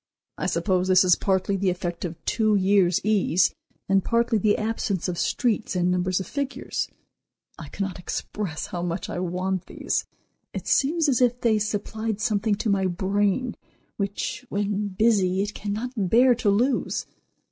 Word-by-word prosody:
I - - -2
suppose 185 -2 +1
this 185 0 +6
is 180 -1 +5
partly 190 0 0
the 195 0 +1
effect 175 -1 -3
of 170 -1 -4
two 215 -2 +2
years' 190 -2 +3
ease, 205 -4 +2 0.3
and 195 0 +3
partly 235 -1 +2
the 205 +1 +2
absence 215 -4 -1
of 180 - -2
streets, 225 -5 0
and 180 0 +2
numbers 180 +1 +1
of 190 - -4
figures. 280 -1 -3 0.7
I - - -8
cannot 195 -2 -4
express 180 -1 -4
how 175 - -5
much 175 +1 -3
I - - -3
want 185 +1 -2
these. - - -2 0.5
It - - -4
seems 320 +3 +2
as 260 -3 +2
if 245 0 +2
they 220 -2 +3
supplied 215 +1 -2
something 215 -1 +1
to 215 - -3
my 190 -1 +2
brain 200 +6 0 0.4
which, 200 +4 -3
when 205 0 -1
busy, 195 -2 +2
it 205 0 -4
cannot 210 +4 -4
bear 230 +5 +4
to 230 -3 0
lose. 245 +7 +1
200 Hz, 160 wpm, -25 LUFS, 185-220 Hz, 0.7 s, this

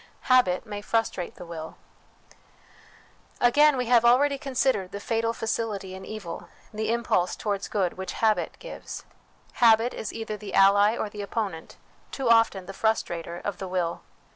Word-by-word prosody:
Habit 210 -8 +3
may 205 -2 -6
Frustrate 215 -5 -1
the 180 - -10
Will. 160 -2 -8 1.6
Again, 290 +4 +5
we 250 - -1
have 235 -1 +4
already 275 +4 +4
considered 260 -9 0
the 200 - -5
fatal 230 +1 0
facility 220 -4 -3
in 190 0 -8
evil, 200 -6 -7 0.2
the 215 +1 -1
impulse 230 -6 +1
towards 205 -2 -3
good, 190 -3 -1
which 190 - -4
habit 220 -1 +1
gives. - - -8 0.6
Habit 230 +1 +5
is 220 - -5
either 220 -2 -5
the 210 -1 -6
ally 205 +3 +5
or - - -2
the 205 0 -7
opponent, 200 -5 -4 0.3
too 270 -2 -3
often 225 -5 +3
the 195 - -8
frustrator, 175 -6 -1
of 205 -3 -3
the 190 - -4
will. 180 -2 -2
215 Hz, 155 wpm, -26 LUFS, 190-230 Hz, 1.6 s, Again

